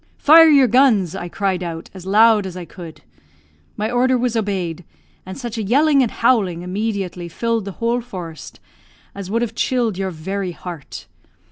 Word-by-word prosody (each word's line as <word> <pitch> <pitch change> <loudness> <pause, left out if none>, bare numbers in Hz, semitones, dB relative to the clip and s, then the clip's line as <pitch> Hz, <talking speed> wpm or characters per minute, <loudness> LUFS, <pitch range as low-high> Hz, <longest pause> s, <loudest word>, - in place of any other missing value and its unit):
'Fire 320 +2 +7
your 280 -3 +6
guns!' 230 - +3
I 175 -2 -6
cried 190 -1 -2
out, 165 -2 -6
as 190 -1 -11
loud 215 0 +4
as 185 -1 -8
I 180 - -7
could. 165 -1 -11 0.8
My 215 +2 -2
order 255 +1 +2
was 245 -1 -1
obeyed, 185 -6 -2 0.4
and 190 - -7
such 240 -3 -5
a - - -2
yelling 280 +6 +3
and 245 - +1
howling 200 -9 +1
immediately 190 -2 -4
filled 230 +3 -2
the 200 - -6
whole 235 +3 -1
forest 180 - -9 0.5
as 200 -2 -8
would 230 +3 0
have 230 -2 -4
chilled 230 -5 -1
your 190 -1 -1
very 185 +2 -4
heart. 170 -4 -9
200 Hz, 170 wpm, -19 LUFS, 180-235 Hz, 0.8 s, Fire